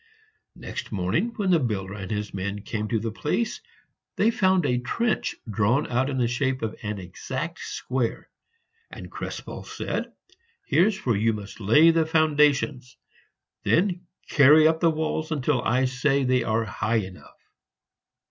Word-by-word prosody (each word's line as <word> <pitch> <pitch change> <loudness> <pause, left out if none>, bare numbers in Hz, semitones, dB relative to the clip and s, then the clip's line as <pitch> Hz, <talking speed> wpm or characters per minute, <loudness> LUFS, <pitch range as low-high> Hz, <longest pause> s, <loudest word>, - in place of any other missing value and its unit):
Next - - -7
morning, 100 - 0
when 195 -4 0
the 170 - +5
builder 100 -7 -2
and 95 -3 -7
his 105 -1 -3
men 100 +1 -4
came 105 0 -3
to 115 - 0
the 115 +1 -3
place, 150 - -2 0.5
they 220 +3 +3
found 185 -5 +2
a 125 -3 +1
trench 215 - -1
drawn 110 +6 +1
out 130 +3 +1
in 135 - -2
the 120 -2 +2
shape 130 +2 -1
of 110 -1 -3
an 105 -1 -4
exact 90 -2 -5
square; 125 -3 -3 0.6
and - - -10
Krespel - - -6
said, - - -4 0.5
"Here's 190 - +2
where 120 -4 +2
you 115 +2 +2
must 105 0 -8
lay 150 +11 +6
the 165 -1 +1
foundations; 150 -5 +2 0.6
then 180 -1 +1 0.2
carry 150 +2 +6
up 160 0 +2
the 165 - +4
walls 160 0 -2
until 145 -3 0
I 125 +3 +2
say 135 +2 +1
they 125 0 +2
are 110 +1 0
high 110 +3 -2
enough." 95 -4 -5
130 Hz, 155 wpm, -25 LUFS, 110-155 Hz, 0.6 s, lay